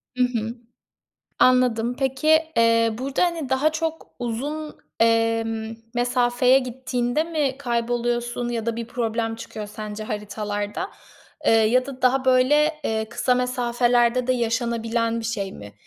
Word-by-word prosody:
I 250 - -1
hı. 235 -2 -1 0.8
Anladım. 250 -2 +3
Peki, 270 +2 -1 0.3
eee, 230 0 +4
burada, 265 +2 -1
hani, 335 -5 -2
daha 265 +4 +2
çok 325 0 -3
uzun, 290 +6 -4 0.2
emm, 225 -1 +1 0.2
mesafeye 245 +1 +3
gittiğinde 250 +2 -1
mi 295 -5 -1
kayboluyorsun 240 -1 -1
ya 235 -2 -3
da 230 -1 -1
bir 230 -1 -4
problem 230 -1 -2
çıkıyor 215 -1 -7
sence 210 0 -7
haritalarda, 210 - -4 0.5
eee, - - +4
ya 225 +3 +4
da 265 -2 -9
daha, 260 +1 +3
böyle, 295 +5 +3
eee, 220 0 -1
kısa 250 +2 +1
mesafelerde 245 -1 +1
de 255 - +3
yaşanabilen 230 -1 -1
bir 225 - -8
şey 200 -4 -3
mi? 100 0 -11
240 Hz, 130 wpm, -23 LUFS, 225-255 Hz, 0.8 s, eee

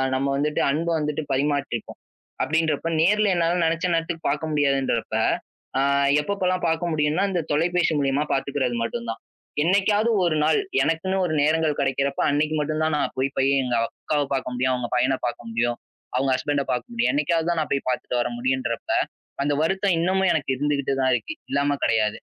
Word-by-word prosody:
நம்ம 135 +1 0
வந்துட்டு 150 +1 0
அன்பு 165 +4 -1
வந்துட்டு 150 0 -2
பரிமாறிக்குவோம் 140 -4 -2 0.4
அப்படின்றப்போ 160 0 0
நேர்ல 205 +3 +3
என்னால 170 +1 +1
நினைச்ச 165 +2 0
நேரத்துக்கு 165 0 -2
பார்க்க 150 +2 -2
முடியாதுன்றப்ப, 135 -5 0 1.1
எப்போப்பல்லாம் 185 +1 -1
பார்க்க 165 +1 -1
முடியும்னா, 150 +4 +1
இந்தத் 175 -4 -2
தொலைபேசி 170 +3 +2
மூலமா 140 +1 +1
பாத்துக்கிறது 135 -2 -1
மட்டும்தான். 115 -1 -4 0.4
என்னைக்காவது 205 +5 +2 0.2
ஒரு 165 -2 +1
நாள் 155 - +3 0.2
எனக்குன்னு 175 +4 0
ஒரு 155 - -1
நேரங்கள் 155 0 +2
கிடைக்கிறப்ப 140 +1 0
அன்னைக்கு 150 +2 +1
மட்டும்தான் 155 +1 0
நான் - - -1
போய்ப் 135 +2 -1
போய் 135 +1 +3
எங்க 125 -1 -1
அக்காவை 145 -2 -2
பார்க்க 130 -1 -2
முடியும், 130 +1 +1
அவங்க 125 -1 -4
பையனை 130 +2 +2
பார்க்க 120 -1 -4
முடியும், 120 +1 0 0.4
அவங்க 135 +2 +1
ஹஸ்பண்ட்ட 140 +1 -1
பார்க்க 125 - -3
முடியும். 235 0 +1
என்னைக்காவது 170 - +1
தான் 170 - 0
நான் - - -4
போய்ப் 140 - -2
பார்த்துட்டு 125 -1 -1
வர - - -1
முடியும்ன்றப்ப, 130 -1 -2 0.5
அந்த 145 +1 +1
வருத்தம் 190 +2 +1
இன்னமும் 190 +2 +2
எனக்கு 140 -3 -2
இருந்துகிட்டு 140 -1 0
தான் 130 0 +3
இருக்கு. 310 - -4 0.2
இல்லாம 145 0 +1
கிடையாது. 110 -2 +2
150 Hz, 160 wpm, -24 LUFS, 135-165 Hz, 1.1 s, நேர்ல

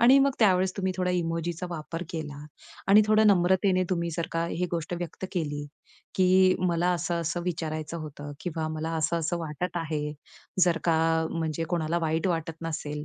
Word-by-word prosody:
आणि 250 +4 +7
मग 275 0 +4
त्यावेळेस 185 -3 +3
तुम्ही 190 -2 0
थोडा 180 -1 0
इमोजीचा 170 0 -1
वापर 165 +1 -5
केला 150 -3 -5 0.4
आणि 210 +2 +8
थोडं 215 0 +5
नम्रतेने 185 0 +3
तुम्ही 170 -2 0
जर 170 - -1
का 165 0 0
ही 180 +1 -1
गोष्ट 165 0 -2
व्यक्त 175 +2 -5
केली, 145 -5 -2 0.5
की 185 0 +5
मला 175 +1 +2
असं-असं 170 0 -1
विचारायचं 160 -2 -3
होतं 145 -1 -7
किंवा 160 -3 -3
मला 160 +1 -3
असं-असं 165 +2 0
वाटत 165 +3 -4
आहे. 150 -2 -2 0.5
जर 170 -2 +2
का 165 -2 +3 0.3
म्हणजे 165 -1 -2
कोणाला 170 0 0
वाईट 160 +1 0
वाटत 165 -2 -1
नसेल 150 -2 -4
170 Hz, 160 wpm, -27 LUFS, 160-180 Hz, 0.5 s, आणि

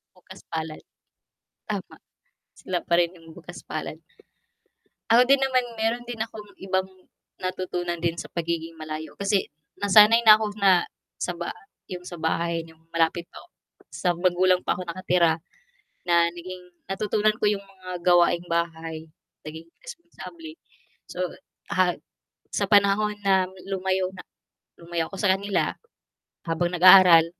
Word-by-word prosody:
Bukas 185 +1 -15
palad. 160 -1 -4 0.9
Tama. - - -5 0.6
Sila 180 -1 -3
pa - - -1
rin 175 +1 0
yung 165 -1 -15
bukas - - -11
palad. - - -6 1.1
Ako 235 +2 +7
din 275 +2 +4
naman 260 -2 +2 0.2
meron 230 +2 0
din 240 -2 -7
akong 220 -1 -5 0.2
ibang 190 0 0 0.6
natutunan 185 -1 -3
din 170 0 -1
sa - - -6
pagiging 165 -1 -4
malayo 155 0 -7
kasi, 200 0 0 0.3
nasanay 210 +3 +7
na 215 -1 +10
ako 220 - -2
na, 190 -3 +5 0.3
sa - - -2
ba 170 - -4 0.4
'yong 180 -1 -6
sa 175 -2 -9
bahay 165 +1 -1
'yong 160 - -18
malapit 165 +1 +1
pa - - -11
ako - - -19 0.4
sa 180 - -2
magulang 180 +1 +2
pa - - -1
ako 185 - -5
nakatira. 170 -2 +1 0.7
Na 170 -1 +4
naging 180 +1 -9 0.2
natutunan 210 +2 0
ko - - -1
'yong 205 - -1
mga 185 -2 -10
gawaing 175 0 +4
bahay, 165 -1 -3 0.3
naging 160 +2 -9 0.2
responsable. 340 -7 -11 0.6
So - - -9 0.6
ha 185 -2 +2 0.6
sa - - 0
panahon 205 0 +3
na 190 -2 +3 0.2
lumayo 190 -1 -1
na - - -9 0.6
lumayo 170 -1 -3
ako 195 - -9
sa 200 -3 +3
kanila, 200 +1 -1 0.7
habang 170 +1 0
nag-aaral. 180 -2 +8
185 Hz, 140 wpm, -25 LUFS, 170-200 Hz, 1.1 s, na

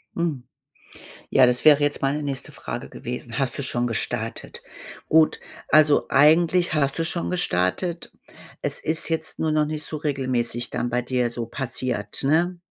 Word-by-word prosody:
Hm. 160 -7 -2 0.9
Ja, 130 - +6
das 125 +3 +1
wäre 150 -1 +7
jetzt 145 0 0
meine 145 +2 0
nächste 135 -2 -4
Frage - - -6
gewesen. 120 -1 -7
Hast 130 -3 0
du - - -1
schon 120 -2 0
gestartet? 115 -4 -3 0.5
Gut, 160 0 +4 0.3
also, 155 -1 +5
eigentlich 165 +5 +4
hast 140 -3 +1
du - - +1
schon 170 +1 -2
gestartet. 170 - -1 0.5
Es - - -1
ist 160 +1 -1
jetzt 160 -1 -2
nur 160 -1 0
noch 155 -1 +2
nicht 155 0 -4
so 155 - -5
regelmäßig 130 -5 -2
dann 120 - -2
bei 125 +1 0
dir 125 -1 -1
so 120 -1 -5
passiert, 125 -3 -4
ne? 170 +5 +1
140 Hz, 160 wpm, -23 LUFS, 125-160 Hz, 0.9 s, wäre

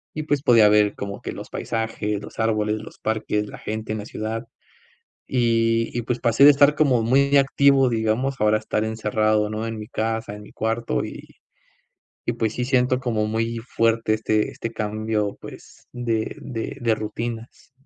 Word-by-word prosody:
y 155 - -3
pues 145 -2 0
podía 115 -5 +6
ver 105 -1 +3
como 100 0 -6
que - - -5
los - - -9
paisajes, 110 -2 -3
los - - -11
árboles, 110 -1 0
los - - -12
parques, 110 -1 -1
la - - -9
gente 110 0 -5
en 110 - -3
la 105 - -7
ciudad. 115 +2 -5 0.8
Y 115 -2 +1
y, - - 0
pues, 125 +1 -2
pasé 115 +4 +4
de 145 - +11
estar 145 +1 +5
como 130 -7 +3
muy 140 +4 +3
activo, 135 -1 +4
digamos, 115 +4 0
a - - +1
ahora 105 0 +4
a - - -5
estar 110 0 -2
encerrado, 110 -1 +1
¿no?, 110 +1 -3
en 115 -1 -4
mi 105 - -7
casa, 110 -3 -2
en 105 - -10
mi - - -14
cuarto. 110 - -1
Y - - -10 0.9
y, - - +1
pues 110 -1 -1
sí, 125 - -1
siento 125 0 +2
como 115 -4 -1
muy 115 +2 -1
fuerte 115 -1 +1
este 110 -1 0
este 115 - -6
cambio, 110 -1 -2
pues, - - -13
de 115 -3 -2
de 115 0 -5
de 115 -2 +2
rutinas. 115 +3 -6
115 Hz, 185 wpm, -23 LUFS, 110-120 Hz, 0.9 s, de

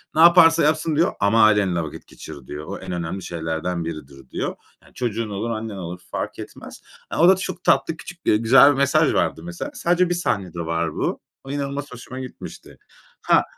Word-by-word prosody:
"Ne 160 - +4
yaparsa 165 -2 +7
yapsın." 155 0 +1
diyor 170 +4 +2
"Ama 110 +2 +4
ailenle 100 -6 +3
vakit 80 - -9
geçir." 70 -3 -11
diyor. 75 +1 -7
"O 100 - -5
en 95 -1 -7
önemli 85 +2 -4
şeylerden 80 +1 -3
biridir." 70 -5 -8
diyor. - - -3 0.3
Yani - - -21
çocuğun 115 -3 -3
olur 105 +4 -3
annen 110 -2 -4
olur 90 0 -6
fark - - -4
etmez. - - -10 0.3
E, - - -1
o 170 +3 +6
da 190 - +7
çok 180 -1 -5
tatlı, 165 - +2
küçük, 175 -1 -10
eee, 105 - +4
güzel 135 +6 +6
bir 135 - -2
mesaj 145 +3 +3
vardı - - 0
mesela. 175 +11 -6
Sadece 175 -5 +1
1 175 - 0
sahnede 100 - -2
var 85 -1 -2
bu. - - -2 0.2
O 135 - -8
inanılmaz 140 0 -4
hoşuma 125 +1 -9
gitmişti. 130 -1 -10 0.4
Ha - - +4
115 Hz, 195 wpm, -22 LUFS, -, 0.4 s, yaparsa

